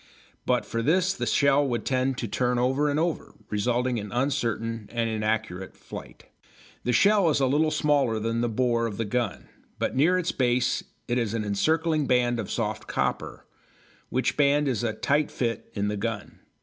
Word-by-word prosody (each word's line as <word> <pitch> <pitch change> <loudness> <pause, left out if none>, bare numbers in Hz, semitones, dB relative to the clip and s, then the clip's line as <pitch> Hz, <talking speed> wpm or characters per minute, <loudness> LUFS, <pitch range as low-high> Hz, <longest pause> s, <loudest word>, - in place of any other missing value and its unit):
But - - +2
for 115 - -2
this 180 +8 +2
the - - -3
shell 140 0 +4
would 120 -2 -2
tend 130 0 0
to 115 - -3
turn 125 +4 0
over 135 +4 +2
and 145 +1 0
over, 170 0 -2 0.2
resulting 120 +3 0
in 105 -1 -7
uncertain 115 -4 -1
and 115 -1 0
inaccurate 110 -4 -2
flight. - - -10 0.6
The 125 - 0
shell 200 - +4
is 150 - +2
a 135 - +3
little 150 +4 +2
smaller 145 -7 +2
than 115 +1 -1
the 120 - 0
bore 115 0 +1
of 105 -3 -6
the 115 - -1
gun, 105 - -2 0.3
but - - -2
near 165 +7 +4
its 180 -1 0
base 125 -1 +1 0.2
it 125 0 +1
has 115 -2 -1
an 110 -2 -2
encircling 155 +8 +1
band 120 -1 +2
of 105 - -4
soft 110 -2 -3
copper, - - -2 0.6
which 130 - 0
band 145 0 +3
is 120 -4 -1
a 115 -2 0
tight 145 +6 +1
fit 115 -2 -3
in 100 -1 0
the 105 0 -2
gun. 110 0 -4
120 Hz, 185 wpm, -26 LUFS, 115-140 Hz, 0.6 s, shell